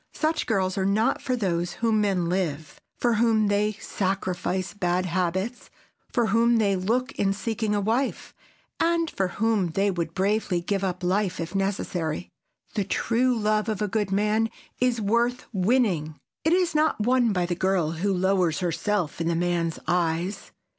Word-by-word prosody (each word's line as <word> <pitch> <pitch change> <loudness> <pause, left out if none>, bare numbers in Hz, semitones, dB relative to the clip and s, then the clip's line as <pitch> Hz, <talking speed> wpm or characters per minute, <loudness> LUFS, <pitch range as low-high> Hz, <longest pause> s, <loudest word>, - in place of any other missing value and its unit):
Such 315 0 0
girls 195 -3 0
are - - +1
not 215 +6 +1
those 185 -9 -1
for - - -18
whom 225 -2 +3
men 190 -4 +1
live, 165 -4 -2 0.2
for 240 -1 +2
whom 220 -3 +3
they 210 +1 +1
sacrifice 190 -2 -2
bad 180 -2 0
habits, 185 +6 -2 0.4
for 240 -2 +2
whom 235 +1 +4
they 200 -3 +2
look 230 +8 0
in 195 -1 +2
seeking 220 0 -2
a - - +1
wife, 230 +7 -1 0.5
and 335 -1 +1
for 190 - 0
whom 210 0 +1
they 195 +5 +1
would 170 -3 -3
bravely 195 -1 +1
give 195 +3 -2
up 185 -1 -2
life 185 +1 0
if 165 +1 -4
necessary. 185 -4 -2 0.4
The 205 - 0
true 240 +5 +1
love 215 0 +1
of 215 -3 -2
a 210 - 0
good 205 -1 -1
man 210 +3 +2 0.3
is 250 -2 +2
worth 235 +4 +1
winning. 185 -7 +1 0.3
It 320 - +3
is 360 -2 +2
not 305 -6 +2
won 245 0 +3
by 180 -3 +1
the 175 - -1
girl 180 -3 +1
who 175 +5 -1
lowers 185 -2 +1
herself 175 0 -1
in 165 - 0
a 170 - +1
man's 170 -1 0
eyes. 175 +3 -1
200 Hz, 165 wpm, -25 LUFS, 180-225 Hz, 0.5 s, whom